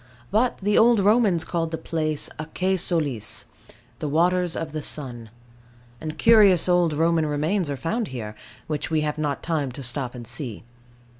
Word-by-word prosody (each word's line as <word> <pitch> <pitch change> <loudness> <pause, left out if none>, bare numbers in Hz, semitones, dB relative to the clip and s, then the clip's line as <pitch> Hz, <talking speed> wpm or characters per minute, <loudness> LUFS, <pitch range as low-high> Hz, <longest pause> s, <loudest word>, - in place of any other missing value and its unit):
But 230 +5 +2
the 205 +1 +2
Old 235 -1 +5
Romans 205 -4 +3
called 165 -2 -2
the 160 - -3
place 155 -3 -2
Aquae 180 +5 -1
Solis 150 - -1 0.5
the 150 - -3
waters 175 +3 +2
of 160 -2 -4
the 155 0 -4
sun; 120 -7 -4 0.7
and 155 -1 -5
curious 210 -7 +6
old 175 -2 +3
Roman 165 +1 +2
remains 155 +4 0
are 140 - -3
found 215 - -2
here, 110 -5 -6 0.3
which 150 0 -3
we 160 -1 +1
have 150 0 -2
not 145 -2 -2
time 150 -6 -1
to 135 - -8
stop 125 0 -2
and 120 -1 -8
see. 120 -2 -2
160 Hz, 165 wpm, -24 LUFS, 145-180 Hz, 0.7 s, curious